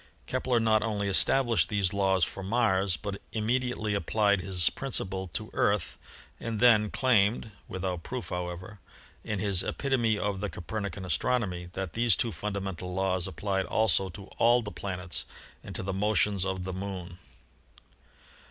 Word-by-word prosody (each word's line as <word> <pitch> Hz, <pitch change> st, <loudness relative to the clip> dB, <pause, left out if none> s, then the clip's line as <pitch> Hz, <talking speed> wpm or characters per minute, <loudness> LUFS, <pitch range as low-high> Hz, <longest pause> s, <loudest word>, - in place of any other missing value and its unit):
Kepler 125 Hz, -1 st, +1 dB
not 110 Hz, -1 st, +3 dB
only 105 Hz, -2 st, -1 dB
established 120 Hz, +4 st, +3 dB
these 100 Hz, -3 st, +1 dB
laws 95 Hz, -3 st, +3 dB
for 95 Hz, -, -6 dB
Mars, 95 Hz, -3 st, +2 dB
but 100 Hz, -2 st, -5 dB
immediately 115 Hz, -1 st, 0 dB
applied 100 Hz, -1 st, +2 dB
his 90 Hz, -1 st, +2 dB
principle 95 Hz, -8 st, -3 dB
to -, -, -3 dB
the -, -, -18 dB
Earth -, -, +1 dB, 0.4 s
and 115 Hz, -2 st, -3 dB
then 110 Hz, -3 st, +6 dB
claimed 110 Hz, -3 st, +2 dB, 0.2 s
(without 90 Hz, -2 st, -3 dB
proof, 125 Hz, +7 st, -5 dB
however) 90 Hz, +3 st, -5 dB, 0.4 s
in 105 Hz, -, -2 dB
his 95 Hz, -2 st, +4 dB
"Epitome 120 Hz, -6 st, +1 dB
of 105 Hz, -2 st, -1 dB
the 105 Hz, -, -1 dB
Copernican 100 Hz, +1 st, -5 dB
Astronomy" 90 Hz, -4 st, 0 dB
that 95 Hz, -4 st, -4 dB
these 115 Hz, -3 st, +3 dB
two 115 Hz, -, 0 dB
fundamental 95 Hz, -4 st, -4 dB
laws 95 Hz, -1 st, 0 dB
applied 95 Hz, 0 st, -2 dB
also 95 Hz, -3 st, +2 dB
to 95 Hz, +3 st, -9 dB, 0.2 s
all 120 Hz, +1 st, +5 dB
the 105 Hz, -, -6 dB
planets 90 Hz, -3 st, -4 dB, 0.4 s
and -, -, -8 dB
to -, -, -3 dB
the 95 Hz, 0 st, -2 dB
motions 100 Hz, -1 st, +2 dB
of 95 Hz, -1 st, -2 dB
the 95 Hz, 0 st, -4 dB
Moon. 95 Hz, -2 st, -6 dB
100 Hz, 150 wpm, -29 LUFS, 95-110 Hz, 0.4 s, then